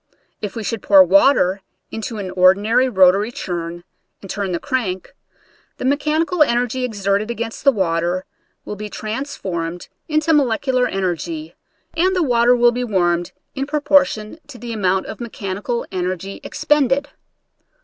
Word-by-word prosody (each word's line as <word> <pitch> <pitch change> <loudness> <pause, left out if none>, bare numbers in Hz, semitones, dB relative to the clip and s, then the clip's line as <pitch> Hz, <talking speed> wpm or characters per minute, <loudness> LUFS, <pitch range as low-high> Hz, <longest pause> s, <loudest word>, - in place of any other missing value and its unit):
If 210 +1 -5
we 225 - -4
should 220 0 -3
pour 195 -2 +7
water 195 0 +4 0.3
into 225 +1 -5
an 190 -3 -5
ordinary 200 +8 +4
rotary 195 +1 +4
churn 175 -5 -5 0.4
and 195 - -11
turn 200 -2 -3
the 175 - 0
crank, 210 -9 -3 0.6
the - - -5
mechanical 305 +5 0
en 240 -5 +4
ergy 250 +1 -1
exerted 205 -2 -1
against 230 -1 -5
the 280 - +6
water 175 -3 -1 0.4
will 210 - -5
be 210 +1 -7
trans 225 +8 -5
formed 170 -1 -5 0.2
into 310 +1 +1
molecular 255 -2 +2
energy, 195 - -3 0.4
and 370 +3 +1
the 360 - +2
water 245 -2 +4
will 240 0 +4
be 250 +1 -3
warmed 175 -6 0 0.2
in 275 0 -3
proportion 285 -5 +1
to 285 -4 -11
the 235 0 -6
amount 190 -3 0
of - - -8
mechanical 220 +1 -4
energy 185 +1 -4
expended. 280 -1 +1
220 Hz, 150 wpm, -19 LUFS, 190-260 Hz, 0.6 s, pour